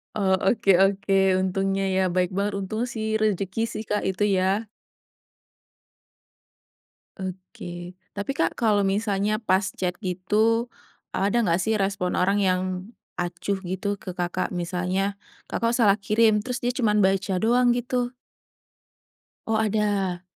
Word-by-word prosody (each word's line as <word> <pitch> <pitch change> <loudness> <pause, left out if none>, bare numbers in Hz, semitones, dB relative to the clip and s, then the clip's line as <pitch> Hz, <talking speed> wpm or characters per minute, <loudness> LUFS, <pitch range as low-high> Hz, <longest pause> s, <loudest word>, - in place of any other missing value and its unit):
Oh 195 -3 +1 0.2
oke 200 -1 +1
oke. 195 0 +1 0.3
Untungnya 195 +1 0
ya 190 - +3
baik 180 0 +1
banget, 200 0 0
untung 205 +3 -3
sih 220 -1 -3 0.2
rezeki 200 0 0
sih, 215 - -4
Kak 210 - +1
itu, 190 +2 -1
ya. 195 +4 +1 2.5
Oke. 180 -1 -7 0.2
Tapi, 200 +6 -3
Kak, - - 0
kalau 210 -3 +3
misalnya 205 +1 0
pas 200 -3 +2
chat 180 -2 -2
itu 210 +6 +1 0.5
ada 200 +3 +1
gak 170 +1 +2
sih 220 +1 +1
respon 195 -2 0
orang 195 +3 +2
yang 185 -1 +2 0.5
acuh 175 +3 -2
gitu 190 +3 -2
ke, 190 -2 -8
Kakak? 180 0 -2
Misalnya, 180 +3 -1 0.3
Kakak, 230 0 0
salah 210 -5 +5
kirim, 215 0 +2
terus 250 -1 -3
dia 245 0 -1
cuman 210 -5 +2
baca 190 -1 +2
doang 245 +4 +3
gitu. 245 0 -1 1.4
Oh, 225 - +1
ada. 205 -4 0
200 Hz, 130 wpm, -25 LUFS, 185-215 Hz, 2.5 s, salah